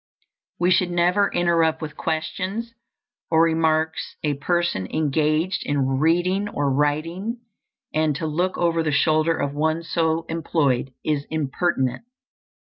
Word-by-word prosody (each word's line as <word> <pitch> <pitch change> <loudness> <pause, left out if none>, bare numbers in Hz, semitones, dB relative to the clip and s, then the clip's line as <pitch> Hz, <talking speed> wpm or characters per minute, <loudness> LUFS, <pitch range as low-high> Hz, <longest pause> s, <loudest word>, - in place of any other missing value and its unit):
We 175 +1 +3
should 180 0 +3
never 175 +3 +2
interrupt 165 -2 +2
with 155 -1 -6
questions 185 +8 -3 0.6
or 160 0 +4
remarks 160 -1 0
a 150 -1 +1
person 145 - -1
engaged 155 - 0
in 135 -2 0
reading 180 +6 +2
or 145 -7 -1
writing, 165 - -1 0.5
and 155 -1 +1
to 160 - -3
look 175 +5 -1
over 170 -1 +1
the 155 -2 0
shoulder 155 +2 +2
of 140 0 -2
one 160 +3 0
so 165 0 0
employed 145 -6 0
is 145 -2 -1
impertinent. 150 - -1
160 Hz, 130 wpm, -23 LUFS, 150-175 Hz, 0.6 s, or